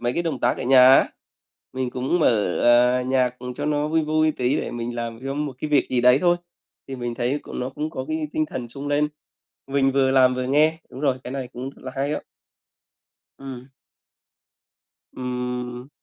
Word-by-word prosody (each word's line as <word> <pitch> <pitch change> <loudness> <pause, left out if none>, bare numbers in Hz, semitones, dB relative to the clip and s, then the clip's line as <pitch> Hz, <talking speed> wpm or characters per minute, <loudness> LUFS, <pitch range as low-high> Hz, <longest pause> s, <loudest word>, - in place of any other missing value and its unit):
mấy 120 0 0
cái 170 - -1
động 160 -6 -3
tác - - +2
ở - - -3
nhà 130 0 +7
á, - - +5 0.7
mình 130 -1 -2
cũng 130 +8 -1
mở, 105 - +2
ờ, 125 +1 +5
nhạc, 125 -1 0
ừm, 125 0 -6
cho 145 +3 -4
nó 150 0 0
vui 160 +1 +2
vui 155 0 +2
tí, 125 +1 0
để - - -3
mình 120 0 -4
làm 115 -1 -4
trong 145 +2 -2
một 135 - -6
cái 150 - -4
việc 145 - +3
gì 125 - +2
đấy 125 +2 +6
thôi. 175 -1 +3 0.5
Thì 135 - -5
mình 120 -1 -4
thấy 125 +4 -1
c - - -16
nó 125 - -4
cũng 150 +3 -4
có 130 -4 -5
cái 155 0 -2
tinh 155 - 0
thần 125 -5 -6
sung 140 +4 -6
lên, 145 +1 +2 0.6
mình 135 0 +2
vừa 135 -1 +3
làm 130 -1 +5
vừa 130 0 -2
nghe. 155 +4 +3
Đúng 130 - -9
rồi, 135 -3 +1
cái - - -6
này 135 -2 -4
cũng 130 +2 -6
rất - - -19
là 130 - -6
hay 140 +2 -1
á. - - -4 1.2
Ừm. 130 -2 -9 1.5
Ừm. 125 0 -4
130 Hz, 210 wpm, -23 LUFS, 125-145 Hz, 1.5 s, nhà